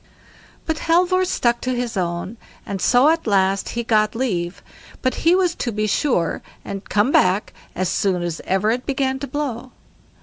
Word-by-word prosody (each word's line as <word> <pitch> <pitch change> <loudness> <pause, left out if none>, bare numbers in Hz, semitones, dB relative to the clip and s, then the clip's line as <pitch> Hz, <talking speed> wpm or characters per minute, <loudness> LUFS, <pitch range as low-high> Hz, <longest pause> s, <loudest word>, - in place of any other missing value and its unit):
But 320 -1 -1
Halvor 360 +2 +3
stuck 240 -9 0
to 255 0 -1
his 245 -2 -3
own, 180 +3 -3 0.3
and 195 -2 -4
so 255 +4 +5
at 325 -4 0
last 195 -1 +2
he 235 - 0
got 215 -1 +2
leave, 185 -8 -2 0.4
but 255 - +2
he 335 +2 +5
was 365 -2 +2
to 245 - -3
be 215 0 -1
sure 210 - 0 0.2
and 195 0 -7
come 210 +6 +2
back 185 -1 +2 0.2
as 185 +1 0
soon 180 -1 0
as 170 -2 -3
ever 195 +3 +1
it 245 +2 -3
began 265 -1 0
to 280 - -5
blow. 265 -4 -4
235 Hz, 175 wpm, -21 LUFS, 195-275 Hz, 0.4 s, so